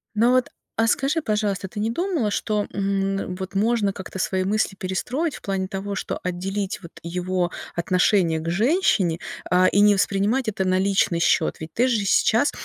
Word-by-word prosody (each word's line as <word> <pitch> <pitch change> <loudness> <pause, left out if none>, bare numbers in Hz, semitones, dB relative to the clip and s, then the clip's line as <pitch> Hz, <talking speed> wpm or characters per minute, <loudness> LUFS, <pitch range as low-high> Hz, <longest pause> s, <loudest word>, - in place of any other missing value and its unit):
Ну, 230 +3 +4
вот, 255 -1 +2 0.3
а 225 - +4
скажи, 280 +7 +1
пожалуйста, 210 -3 -1
ты 200 - -7
не 215 +2 0
думала, 330 - -1
что, 210 0 -1
м, 195 -1 -1
вот 190 +1 -7
можно 210 -1 +1
как-то 190 -1 -8
свои 185 0 0
мысли 205 +1 0
перестроить 250 - -2
в - - -11
плане 195 -1 -2
того, 195 +1 -4
что - - -4
отделить 190 +2 -3
вот 170 - -10
его 180 +1 -1 0.3
отношение 180 -1 +2
к 160 - -7
женщине, 205 - +2 0.3
а, 180 +1 +4
и 200 - +3
не 205 0 +6
воспринимать 205 +6 +1
это 195 -2 -2
на 185 0 +2
личный 190 -3 +2
счет. 165 -1 +2
Ведь 160 0 -8
ты 250 +3 +2
же 220 -5 +1
сейчас, 225 +7 +3
195 Hz, 180 wpm, -23 LUFS, 185-220 Hz, 0.3 s, не